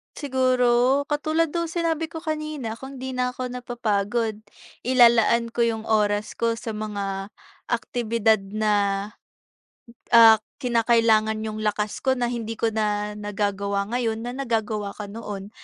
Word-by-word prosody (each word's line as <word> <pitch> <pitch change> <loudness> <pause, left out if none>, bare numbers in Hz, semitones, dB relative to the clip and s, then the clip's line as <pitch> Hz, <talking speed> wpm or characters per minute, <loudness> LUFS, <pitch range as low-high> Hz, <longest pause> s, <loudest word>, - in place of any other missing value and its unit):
Siguro, 255 0 +2
katulad 310 +1 +1
nung 335 -1 -1
sinabi 330 -1 -1
ko 325 0 -8
kanina, 305 -8 -4
kung 270 +1 -9
'di 260 0 -5
na 250 0 -1
ko 250 -1 -4
napapagod, 225 -3 -1 0.4
ilalaan 235 -2 +4
ko 240 - -7
'yung 225 -2 +1
oras 210 -1 0
ko 230 0 +1
sa 225 0 -5
mga 200 -2 -4 0.4
aktibidad 230 -3 +1 0.2
na, 205 -1 +1 1.0
ah, 225 -1 +9 0.2
kinakailangan 230 -2 +3
'yung 215 0 -4
lakas 210 0 -1
ko 265 -1 +1
na 245 -2 -1
hindi 230 -2 -4
ko 225 0 0
na 210 -1 -1
nagagawa 200 -1 -2
ngayon 230 -2 -1
na 245 +2 -5
nagagawa 220 -5 -2
ko 205 -1 -8
noon. 205 -2 -7
230 Hz, 135 wpm, -24 LUFS, 210-250 Hz, 1.0 s, ah